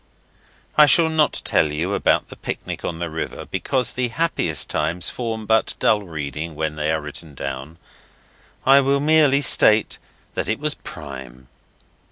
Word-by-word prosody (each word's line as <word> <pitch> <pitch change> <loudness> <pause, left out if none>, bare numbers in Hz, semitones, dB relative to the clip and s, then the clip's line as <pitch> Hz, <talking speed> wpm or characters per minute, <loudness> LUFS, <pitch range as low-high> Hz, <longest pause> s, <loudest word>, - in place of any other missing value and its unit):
I 150 - +9
shall 165 +1 +6
not 155 -2 +1
tell 75 - +2
you 85 +7 -2
about - - +1
the - - -10
picnic - - -6
on 85 - -3
the 85 0 -3
river 80 0 -5
because 125 -3 -1
the 125 -1 -1
happiest 115 - -1
times 85 +1 -1
form 115 -3 -4
but 110 +1 +1
dull 105 - +2
reading 80 -2 -6
when 80 0 -2
they 75 +1 -1
are 80 - 0
written 75 0 -8
down. 70 +4 -6 0.9
I 135 +1 +7
will 140 +1 +1
merely 145 -2 +4
state 110 -5 +4 0.3
that - - -2
it - - 0
was - - -2
prime. 65 -3 -10
85 Hz, 160 wpm, -21 LUFS, -, 0.9 s, I